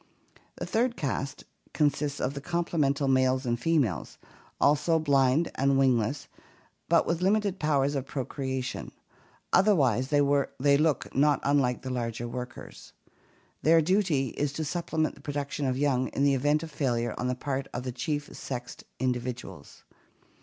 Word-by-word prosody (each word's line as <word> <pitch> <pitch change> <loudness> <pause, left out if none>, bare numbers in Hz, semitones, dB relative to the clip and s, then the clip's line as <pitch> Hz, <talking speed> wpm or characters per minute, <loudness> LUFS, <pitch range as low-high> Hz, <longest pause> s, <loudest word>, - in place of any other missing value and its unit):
The - - -5
third 235 +2 0
caste 135 0 -3 0.3
consists 145 -1 0
of 130 - -1
the 140 - -6
complement^ 150 -4 0
males 130 0 +2
and 120 -1 0
females, 135 - 0 0.4
also 150 +3 +3
blind 140 0 +2
and 135 0 +2
wingless, 130 +1 +1 0.6
but 170 -1 +4
with 170 +1 -1
limited 200 0 +1
powers 145 -2 +1
of 135 -2 -3
procreation; 130 -2 -4 0.6
otherwise 140 - +4
they 145 +1 +2 0.6
look 155 -1 0
not 145 +1 +4
unlike 140 -3 +1
the 130 - -4
larger 120 -1 -3
workers. 125 +1 -8 0.7
Their 165 +1 +5
duty 165 -6 +1
is 145 +4 -2
to 155 +1 -3
supplement 160 0 -1
the - - -17
production 145 -1 -3
of 130 0 0
young 130 -2 +1
in 140 - -2
the 140 -1 +4
event 145 +4 +1
of 160 - -8
failure 120 -5 -1
on 125 - -1
the 125 - 0
part 135 +1 -3
of 125 - -4
the 130 - -3
chief 145 +4 -3
sexed 125 -2 -6
individuals. 125 -1 -4
140 Hz, 145 wpm, -28 LUFS, 130-155 Hz, 0.7 s, Their